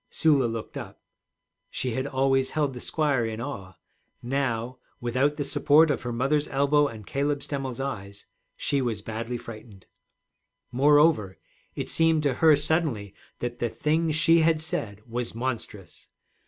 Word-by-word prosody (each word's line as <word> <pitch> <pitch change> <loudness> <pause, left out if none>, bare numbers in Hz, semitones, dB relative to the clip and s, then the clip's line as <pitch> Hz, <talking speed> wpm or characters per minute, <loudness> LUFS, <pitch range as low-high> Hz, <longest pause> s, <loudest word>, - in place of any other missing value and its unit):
Sula 145 -5 +3
looked 115 -1 -6
up. - - -8 0.7
She 130 - -3
had 130 +4 -2
always 135 -1 +1
held 145 -3 +1
the 125 - -7
squire 145 -3 0
in 110 -1 -4
awe; 100 -8 -6 0.5
now, 125 -1 -2 0.2
without 130 +5 0
the 145 - -1
support 150 +2 +4
of 140 - -2
her 120 - -4
mother's 135 +5 0
elbow 145 +2 +2
and 110 -5 -9
Caleb 140 +3 -1
Stemmel's 135 -4 -4
eyes, 100 -7 -5 0.3
she 140 -1 0
was 115 -5 -2
badly 115 +2 -4
frightened. 110 -4 -11 0.9
Moreover, 140 - +4 0.4
it - - -4
seemed 165 -1 +3
to 140 -2 +2
her 160 -2 +7
suddenly 145 - -1 0.3
that 120 0 -4
the 120 - 0
thing 160 +7 0
she 155 +2 +4
had 160 -1 +3
said 105 - -2
was 120 -1 -4
monstrous. 115 -7 -5
130 Hz, 150 wpm, -26 LUFS, 115-145 Hz, 0.9 s, her